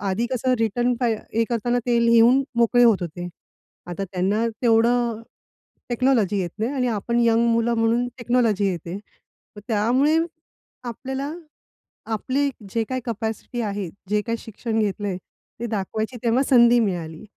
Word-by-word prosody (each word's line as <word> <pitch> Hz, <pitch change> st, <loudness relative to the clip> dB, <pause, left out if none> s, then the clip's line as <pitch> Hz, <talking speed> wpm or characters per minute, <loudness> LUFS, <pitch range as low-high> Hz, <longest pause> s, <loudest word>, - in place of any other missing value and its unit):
आधी 200 Hz, +4 st, -1 dB
कसं, 255 Hz, 0 st, +1 dB
रिटर्न 240 Hz, +3 st, +1 dB
फा 245 Hz, -, +2 dB, 0.3 s
हे 230 Hz, -, +3 dB
करताना 240 Hz, +1 st, 0 dB
ते 240 Hz, -1 st, +3 dB
लिहून 235 Hz, +3 st, +5 dB, 0.2 s
मोकळे 240 Hz, +1 st, +4 dB
होत 225 Hz, -4 st, +6 dB
होते. 175 Hz, +1 st, -5 dB, 0.6 s
आता 180 Hz, +2 st, -4 dB
त्यांना 195 Hz, +5 st, 0 dB, 0.2 s
तेवढं 235 Hz, 0 st, +2 dB, 0.7 s
टेक्नॉलॉजी 235 Hz, -5 st, +2 dB
येत 175 Hz, -, -3 dB
नाही 225 Hz, +5 st, -1 dB
आणि 255 Hz, -2 st, 0 dB
आपण 235 Hz, +4 st, -1 dB
यंग 230 Hz, 0 st, +3 dB
मुलं 230 Hz, +1 st, +1 dB
म्हणून 230 Hz, +2 st, +2 dB
टेक्नॉलॉजी 230 Hz, -4 st, +1 dB
येते. 175 Hz, +2 st, -5 dB
तर 210 Hz, 0 st, -19 dB
त्यामुळे 250 Hz, +9 st, +2 dB, 0.7 s
आपल्याला 265 Hz, +4 st, -4 dB, 0.8 s
आपली 275 Hz, +6 st, 0 dB, 0.2 s
जे 230 Hz, -, +1 dB
काही 255 Hz, -1 st, -2 dB
कॅपॅसिटी 225 Hz, +2 st, -4 dB
आहे, 205 Hz, -4 st, -3 dB, 0.2 s
जे 210 Hz, 0 st, +2 dB
काही 230 Hz, +1 st, -3 dB
शिक्षण 225 Hz, +1 st, -4 dB
घेतलंय, 205 Hz, -2 st, -1 dB, 0.4 s
ते 235 Hz, -, -3 dB
दाखवायची 220 Hz, +3 st, -3 dB
तेव्हा 240 Hz, +4 st, +2 dB
संधी 240 Hz, -2 st, +6 dB
मिळाली. 175 Hz, -4 st, -3 dB
230 Hz, 140 wpm, -23 LUFS, 205-245 Hz, 0.8 s, होत